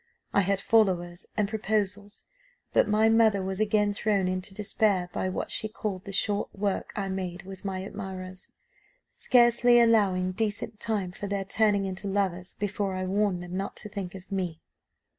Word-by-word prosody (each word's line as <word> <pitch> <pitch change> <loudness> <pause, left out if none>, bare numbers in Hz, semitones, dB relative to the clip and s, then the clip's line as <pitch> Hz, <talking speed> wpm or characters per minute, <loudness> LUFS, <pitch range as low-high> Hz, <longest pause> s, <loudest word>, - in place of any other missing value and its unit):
I 200 - +5
had 195 +1 +1
followers 185 -5 +1
and 210 -2 +2
proposals; 205 -1 -2 0.5
but - - +4
my 215 +1 +4
mother 220 -3 +4
was 190 +1 -3
again 210 -1 +2
thrown 200 -2 +1
into 185 +1 -3
despair 200 -3 +1
by 185 - -1
what 185 - -4
she 215 - -1
called 205 -3 -4
the 195 - -6
short 205 +1 +1
work 200 -1 -1
I 200 -2 -2
made 185 -1 -4
with 190 0 -10
my 190 -2 -3
admirers, 185 -2 -7 0.6
scarcely 240 0 +5
allowing 200 -6 +3
decent 210 +1 -3
time 205 -5 -1
for 200 +2 -6
their 200 -1 -2
turning 205 0 +2
into 190 +1 -5
lovers 190 -2 -1
before 205 -1 -2
I 185 0 -2
warned 195 -2 0
them 180 +1 -7
not 195 +1 -3
to 210 - -7
think 195 -2 -5
of 190 +1 -12
me. 180 -4 -2
200 Hz, 170 wpm, -28 LUFS, 185-210 Hz, 0.6 s, I